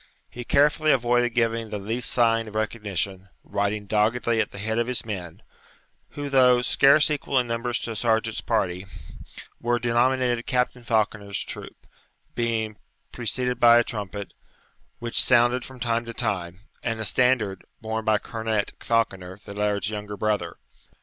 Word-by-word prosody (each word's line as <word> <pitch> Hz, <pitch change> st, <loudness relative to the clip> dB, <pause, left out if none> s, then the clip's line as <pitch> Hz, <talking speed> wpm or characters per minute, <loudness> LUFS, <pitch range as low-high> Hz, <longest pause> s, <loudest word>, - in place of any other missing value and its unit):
He 125 Hz, -, -7 dB
carefully 150 Hz, +4 st, +3 dB
avoided 120 Hz, -1 st, +2 dB
giving 115 Hz, -1 st, 0 dB
the 105 Hz, -, -3 dB
least 115 Hz, +5 st, -1 dB
sign 115 Hz, -2 st, +2 dB
of 105 Hz, -, -10 dB
recognition, 100 Hz, -3 st, -3 dB
riding 100 Hz, +1 st, -2 dB
doggedly 110 Hz, +3 st, +1 dB
at -, -, -2 dB
the -, -, -11 dB
head 110 Hz, +3 st, -1 dB
of 120 Hz, -, 0 dB
his 125 Hz, -2 st, -2 dB
men, 90 Hz, -7 st, -6 dB, 0.7 s
who, 145 Hz, 0 st, -4 dB
though 125 Hz, -3 st, +5 dB
scarce 140 Hz, +4 st, +5 dB
equal 140 Hz, -2 st, -1 dB
in 125 Hz, -, +3 dB
numbers 115 Hz, +1 st, -2 dB
to 115 Hz, -, -4 dB
a -, -, -5 dB
sergeant's 110 Hz, 0 st, 0 dB
party, 95 Hz, -4 st, -1 dB, 0.7 s
were 120 Hz, +1 st, +1 dB
denominated 120 Hz, +1 st, +1 dB
Captain 125 Hz, 0 st, 0 dB
Falconer's 105 Hz, -3 st, -1 dB
troop, -, -, -9 dB, 0.5 s
being 115 Hz, -2 st, -1 dB, 0.3 s
preceded 125 Hz, +1 st, -2 dB
by 120 Hz, -1 st, +7 dB
a 120 Hz, -, +5 dB
trumpet, 105 Hz, -3 st, -6 dB, 0.6 s
which 120 Hz, 0 st, 0 dB
sounded 120 Hz, 0 st, +3 dB
from 130 Hz, 0 st, -11 dB
time 115 Hz, 0 st, 0 dB
to 115 Hz, 0 st, -8 dB
time, 90 Hz, -5 st, -3 dB, 0.2 s
and 115 Hz, -2 st, -2 dB
a 110 Hz, -, -2 dB
standard, 125 Hz, -6 st, +2 dB, 0.2 s
borne 110 Hz, 0 st, -3 dB
by 110 Hz, -1 st, +3 dB
Cornet 110 Hz, -1 st, -2 dB
Falconer, 95 Hz, -5 st, -1 dB
the 100 Hz, -, -8 dB
laird's 105 Hz, 0 st, -1 dB
younger 105 Hz, -1 st, -5 dB
brother. 105 Hz, 0 st, -1 dB
115 Hz, 155 wpm, -25 LUFS, 105-120 Hz, 0.7 s, by